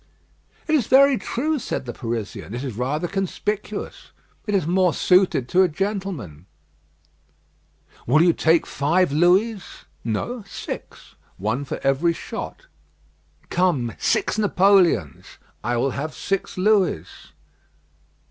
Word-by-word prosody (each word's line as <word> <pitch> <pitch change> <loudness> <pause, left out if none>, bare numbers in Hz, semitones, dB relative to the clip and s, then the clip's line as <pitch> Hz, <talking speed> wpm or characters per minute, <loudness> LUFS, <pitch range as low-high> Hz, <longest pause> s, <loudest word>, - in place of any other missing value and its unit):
"It 315 - 0
is 275 -8 +2
very 275 +1 +6
true," 295 +6 -2
said 180 - -4
the 120 - -5
Parisian. 115 -2 -5
"It 125 - -4
is 130 -4 -4
rather 140 +8 -1
conspicuous. 200 +2 -4 0.4
It 205 - 0
is 190 - +1
more 180 -1 +2
suited 180 -9 +3
to 185 +1 +4
a 190 - +5
gentleman." 175 - -4 1.6
"Will 155 +7 +5
you 170 -1 +4
take 160 +1 +3
five 170 +4 +1
Louis?" 185 +7 +3 0.4
"No, 205 - -3
six; - - -8 0.2
one 110 +8 -2
for - - -5
every 135 +5 +2
shot." - - -7 0.9
"Come, 160 -10 +1
six - - 0
Napoleons." 185 - +2 0.3
"I 120 +2 0
will 135 +3 +1
have 150 +4 -5
six 195 -1 -3
Louis." 185 - +2
175 Hz, 120 wpm, -22 LUFS, 130-195 Hz, 1.6 s, very